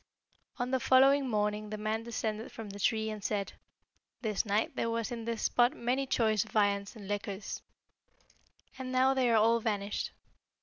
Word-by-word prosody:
"On 250 0 -2
the 260 - +2
following 270 +2 +5
morning 210 -1 0
the 215 - -4
man 215 +1 -1
descended 225 -1 -3
from 225 -5 -8
the 200 - -9
tree, 220 +2 +1
and 210 -2 -7
said, 200 -1 -2 0.7
'This 215 -1 0
night 210 +2 0
there 230 - 0
was 230 +1 -2
in 230 -2 -5
this 230 -1 -3
spot 245 +2 +3
many 255 +2 -1
choice 220 -5 +2
viands 200 -1 0
and 205 -3 -10
liquors, 205 -1 -4 1.2
and 255 -1 -4
now 260 +1 +4
they 260 -2 +2
are 230 - +4
all 230 +2 +4
vanished.' 205 -2 -2
220 Hz, 170 wpm, -31 LUFS, 210-245 Hz, 1.2 s, following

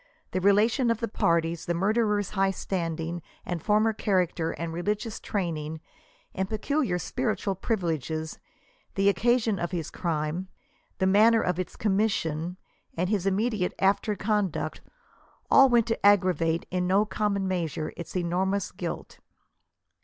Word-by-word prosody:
The 185 - -1
relation 215 +6 +3
of 230 -1 +1
the 230 - -1
parties, 170 -4 0
the 175 - 0
murderer's 210 +1 +1
high 195 -1 +2
standing 170 -3 -3 0.2
and 175 -2 -3
former 215 +1 +3
character 180 -6 0
and 165 0 -4
religious 205 +5 -2
training 160 -5 -3 0.5
and 190 0 -2
peculiar 220 -2 0
spiritual 215 0 -2
privi 205 +1 -1 0.2
leges, 160 +4 -5 0.6
the 195 0 +4
occasion 220 +1 +2
of 175 - -2
his 170 -5 -4
crime, 165 +1 -2 0.5
th« 190 - +1
manner 220 +4 +5
of 180 0 -1
its 185 - -4
commission, 185 -5 0 0.4
and 180 +2 0
his 195 -3 0
immediate 205 -1 0
after 200 +2 +2
conduct, 210 -2 -1 0.7
all 270 -1 +8
went 240 -2 +4
to 230 -1 -2
aggravate 180 -5 +3
in 180 0 0
no 195 +3 +3
common 200 -1 -1
measure 165 -4 -2
its 170 - -8
enormous 185 +3 0
guilt. - - -6
190 Hz, 140 wpm, -27 LUFS, 170-210 Hz, 0.7 s, all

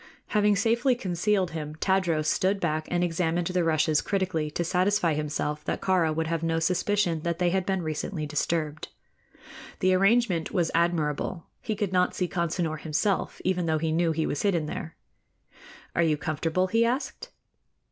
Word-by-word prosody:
Having 210 -1 +3
safely 235 +5 +2
concealed 190 -2 0
him, 155 -2 -5
Tadros 170 -3 +1
stood 195 +5 +1
back 155 -3 -1
and 175 0 +1
examined 170 0 0
the 180 0 0
rushes 155 -1 +2
critically 185 -6 -1
to 175 - -2
satisfy 180 0 +2
himself 150 0 -2
that - - -2
Kāra 180 -4 +2
would 160 0 0
have 165 0 -2
no 165 0 0
suspicion 180 +1 +1
that 170 0 -2
they 175 0 +1
had 190 0 0
been 190 -2 0
recently 155 +1 -3
disturbed. 150 0 -2 0.9
The 185 0 +3
arrangement 195 -3 +3
was 175 -4 0
admirable. 165 0 0 0.2
He 215 - -2
could 200 -2 -2
not 180 0 +2
see 180 - 0
Consinor 170 -3 -2
himself, 160 +6 -1
even 180 -2 +1
though 160 -1 +2
he 160 0 -1
knew 165 +1 +2
he 160 0 -1
was 145 - -2
hidden 175 -6 +1
there. 160 +1 -6 1.0
"Are - - +3
you 155 -3 +2
comfortable?" 160 +4 -1
he 225 +5 +2
asked. 245 +5 -2
170 Hz, 165 wpm, -27 LUFS, 160-190 Hz, 1.0 s, Having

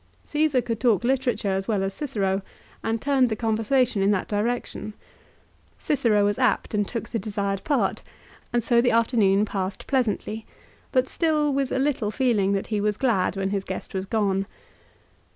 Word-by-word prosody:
Caesar 295 -4 +1
could 230 -2 -3
talk 235 -5 +2
literature 245 -5 0
as 190 0 -1
well 205 -4 +1
as 195 0 -2
Cicero, 200 -9 -1 0.4
and 225 0 -1
turned 270 -1 +2
the 220 - -1
conversation 225 +1 +1
in 195 - +3
that 205 -3 +1
direction. 215 0 -2 0.8
Cicero 225 -8 +2
was 205 +2 0
apt 250 -4 +1
and 205 -1 +1
took 230 - -4
the 230 - -2
desired 200 -1 -2
part, 285 -3 0 0.5
and 240 -1 +1
so 235 +1 +4
the 245 - +3
afternoon 220 -3 +3
passed 195 -2 -4
pleasantly; 225 -4 -1 0.4
but 255 -1 +2
still 305 -3 +1
with 275 -1 0
a - - 0
little 265 -6 0
feeling 210 -4 +1
that 195 - -1
he 210 - +1
was 210 0 0
glad 215 -8 +1
when 195 0 -1
his 200 -1 -1
guest 190 -1 -6
was 190 0 -3
gone. 195 -2 0
220 Hz, 170 wpm, -25 LUFS, 200-255 Hz, 0.8 s, so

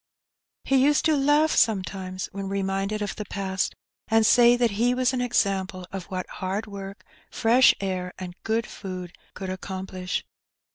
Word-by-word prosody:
He 265 -1 +3
used 295 +1 +3
to 315 -1 +4
laugh 295 +3 +3
sometimes 190 -3 0
when 195 -1 -5
reminded 195 +2 -1
of 205 - -4
the 210 - -5
past, 190 -2 -2 0.3
and 225 0 +4
say 240 +2 +6
that 240 -2 +2
he 235 +5 +1
was 255 0 +1
an 250 - 0
example 195 -6 0
of 195 -3 -5
what 185 0 -4
hard 195 +3 -3
work, 200 -1 -8 0.3
fresh 240 +3 +5
air, 185 -2 -3
and 180 -1 -6
good 225 0 0
food 185 -2 -7 0.2
could 190 -1 -5
accomplish. 185 -1 -4
200 Hz, 155 wpm, -25 LUFS, 190-235 Hz, 0.3 s, say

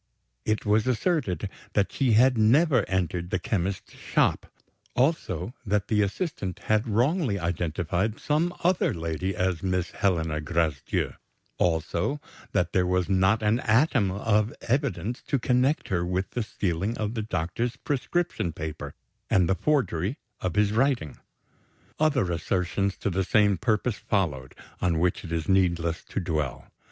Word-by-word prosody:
It 110 0 0
was 105 +2 +2
asserted 125 - 0 0.3
that 100 -1 +1
she 130 -5 +2
had 125 +4 +5
never 125 +3 +4
entered 90 -2 -1
the 90 - 0
chemist's 95 0 -2
shop; - - 0 0.5
also, 120 - 0
that 105 -3 0
the 105 -2 +3
assistant 100 - -2
had 110 +1 +1
wrongly 120 - +1
identified 85 +4 -1
some 155 +4 +1
other 180 - +2
lady 85 +3 -2
as 90 -2 0
Miss 90 -2 -1
Helena 80 -5 0
Gracedieu; 80 -3 -1 0.5
also, 85 - 0 0.3
that 90 -1 0
there 90 -1 +2
was 90 0 +1
not 95 +3 +3
an 105 +3 +3
atom 115 -3 +3
of 105 +3 +1
evidence 125 -2 -1
to 140 - +1
connect 125 +4 +1
her 85 -3 +1
with 90 +2 -2
the 120 - -2
stealing 100 0 -2
of 105 0 -2
the 115 - -2
doctor's 110 +5 -2
prescription 140 - -1
paper 75 -3 -6 0.3
and 90 -3 +4
the 95 - +3
forgery 105 - 0 0.2
of 90 -3 -2
his 105 -1 +3
writing. 115 - 0 0.8
Other 140 - +2
assertions 90 +3 -1
to 100 - -2
the 95 +2 0
same 105 +1 +3
purpose 110 +2 0
followed, 75 -11 -1 0.3
on 85 -3 +2
which 90 +2 +1
it 85 - -8
is 80 -1 -2
needless 85 -4 +1
to - - -3
dwell. 75 -8 -3
100 Hz, 145 wpm, -26 LUFS, 85-120 Hz, 0.8 s, had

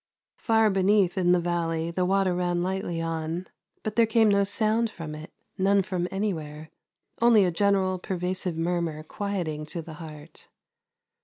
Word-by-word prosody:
Far 220 -1 +3
beneath 195 -1 +3
in 180 -2 +2
the 180 - +4
valley 170 -1 -1
the 180 +1 0
water 195 -1 +2
ran 175 -1 0
lightly 185 -2 -2
on, 165 +2 -3 0.4
but 215 -1 -3
there 230 -1 +4
came 225 -1 +4
no 200 0 +4
sound 220 +3 +1
from 165 -6 -7
it, 155 +3 -9 0.3
none 195 +1 +3
from 180 -1 -2
anywhere; 160 -6 -4 0.5
only 230 -4 +6
a 180 - +1
general 190 0 +1
pervasive 180 -1 -2
murmur 165 -2 -1
quieting 165 -5 -4
to 165 +2 -4
the 160 - -9
heart. 155 0 -11
180 Hz, 155 wpm, -26 LUFS, 165-200 Hz, 0.5 s, only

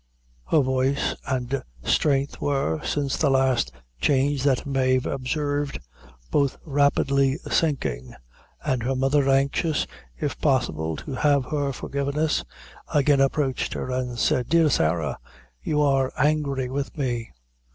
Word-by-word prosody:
Her 155 - +4
voice 130 +1 +1
and 130 0 -1 0.2
strength 140 - +1
were, 135 - 0
since 140 -2 -1
the 150 - +2
last 130 - +2 0.3
change 140 - +2
that 135 -3 +2
Mave 130 -2 +1
observed, 145 +1 -2 0.5
both 140 -2 +1
rapidly 140 -1 +2
sinking, 135 - -1 0.5
and 130 -2 0
her 130 +3 -1
mother, 135 +1 +2
anxious, 140 +4 +2 0.3
if 145 -2 -3
possible, 80 - +1
to 105 - -7
have 140 -1 +2
her 145 -1 -1
forgiveness, 140 - -1 0.5
again 145 -1 +3
approached 135 -1 0
her 130 - -4
and 125 -1 -2
said: 125 0 +1
"Dear 165 -1 +4
Sarah 80 - 0 0.4
you 150 - 0
are 135 -2 +2
angry 145 -3 +1
with 140 +4 -4
me. 120 -5 -2
135 Hz, 125 wpm, -24 LUFS, 130-145 Hz, 0.5 s, Her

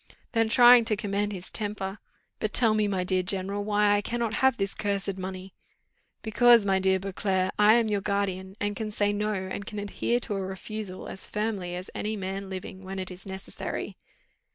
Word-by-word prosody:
Then 225 -1 +2
trying 240 +1 +8
to 220 -2 +2
command 205 0 -1
his 185 -2 -6
temper, 205 -2 -4 0.4
"But 215 - -2
tell 225 -3 +5
me, 215 -1 +2
my 190 -2 -1
dear 185 0 +1
general, 195 +2 0
why 205 0 +3
I 205 - +1
cannot 230 0 -2
have 265 -2 +4
this 195 -1 0
cursed 200 -1 -2
money?" 185 0 -6 0.7
"Because, 230 0 +5
my 190 -1 +2
dear 190 0 +3
Beauclerc, 190 0 -1
I 210 +2 +7
am 235 -2 +3
your 205 -2 0
guardian, 195 -2 -2
and 205 0 -1
can 220 0 -3
say 205 -1 +1
no, 210 +1 -1
and 190 +1 -4
can 210 +1 -8
adhere 205 +4 -1
to 225 - -2
a 195 - -2
refusal 190 +1 -6
as 190 - -5
firmly 205 -5 -2
as 180 +1 -7
any 215 +1 -2
man 195 0 -5
living, 190 0 -7
when 190 0 -7
it 185 0 -4
is 180 +2 -9
necessary." 190 0 -5
200 Hz, 195 wpm, -27 LUFS, 190-215 Hz, 0.7 s, trying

